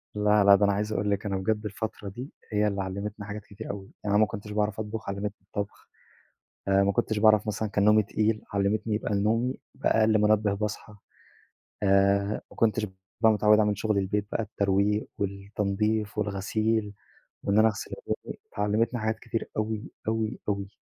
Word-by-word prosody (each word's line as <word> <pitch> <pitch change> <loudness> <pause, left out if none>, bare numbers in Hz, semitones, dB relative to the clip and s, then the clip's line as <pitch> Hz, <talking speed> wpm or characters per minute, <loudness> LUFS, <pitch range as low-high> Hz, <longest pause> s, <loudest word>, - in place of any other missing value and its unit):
لا، 105 0 +4
لا 100 0 +8
ده 100 +1 +3
أنا 100 - +3
عايز 105 +2 -1
أقول 105 +1 0
لِك 100 +1 -1
أنا 100 -2 -1
بجد 105 +3 -1
الفترة 105 0 -4
دي، 125 +8 -7 0.2
هي 105 0 +2
اللي 100 -1 -1
علمتني 100 +2 -5
حاجات 105 0 -7
كتير 100 - -7
أوي، 100 -1 -9
يعني 105 -1 +1
أنا 105 - +5
ما - - +6
كنتش 105 +1 -7
باعرف 105 0 0
أطبخ، 110 -1 -4
علّمتني 100 +1 -2
الطبخ، 100 -1 -6 0.8
آآ، 100 0 +4
ما 100 - +2
كنتش 110 +2 0
باعرف 110 0 +5
مثلًا 105 0 -2
كان 100 0 +1
نومي 105 0 +6
تقيل، 110 +1 0
علمتني 105 +2 0
يبقى 105 0 -1
نومي 115 +6 +1 0.2
بقى 135 -4 +2
أقل 110 0 +4
منبه 105 -1 +3
باصحى، 105 +1 -4 0.9
آآ، 100 +1 +3
ما - - -14
كنتش 110 -1 +2 0.4
بقى 110 -1 +6
متعوِّد 105 0 +5
أعمل 105 -1 +2
شُغل 105 0 0
البيت 100 +1 0
بقى - - 0
الترويق 100 +1 +1
والتنضيف 100 +2 -1
والغسيل، 105 +1 0 0.5
وإن 100 +1 +2
أنا 110 +1 +7
أغسل 105 - -5
هدومي، - - -4 0.2
فعلّمتني 110 +3 +1
حاجات 110 0 -1
كتير 115 - -4
أوي، 110 0 -2 0.2
أوي، 110 0 -1
أوي. 100 -1 -1
105 Hz, 180 wpm, -27 LUFS, 100-110 Hz, 0.9 s, لا